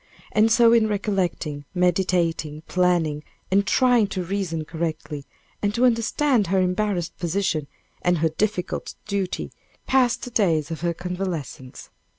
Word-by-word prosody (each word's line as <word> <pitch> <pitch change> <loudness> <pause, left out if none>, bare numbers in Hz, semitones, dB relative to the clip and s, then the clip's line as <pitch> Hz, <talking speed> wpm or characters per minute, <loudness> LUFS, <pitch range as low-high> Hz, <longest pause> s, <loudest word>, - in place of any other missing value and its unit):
And 220 +1 +3
so 230 0 +6
in 225 -2 +4
recollecting, 185 -8 -2
meditating, 170 -4 +1
planning, 175 -5 +1 0.3
and 200 +1 +3
trying 245 0 +4
to 185 -2 -3
reason 175 -4 -2
correctly, 155 -3 -4 0.4
and 205 0 0
to 245 +2 +3
understand 235 -1 +2
her 190 +2 +2
embarrassed 185 -1 0
position, 170 -4 -1 0.3
and 175 0 +2
her 160 +1 +2
difficult 190 +3 -2
duty, 200 -3 -2 0.3
passed 255 -3 +2
the 245 - -6
days 165 -8 +1
of 160 - -5
her 170 -1 0
convalescence. 175 -8 -5
180 Hz, 135 wpm, -24 LUFS, 165-210 Hz, 0.4 s, so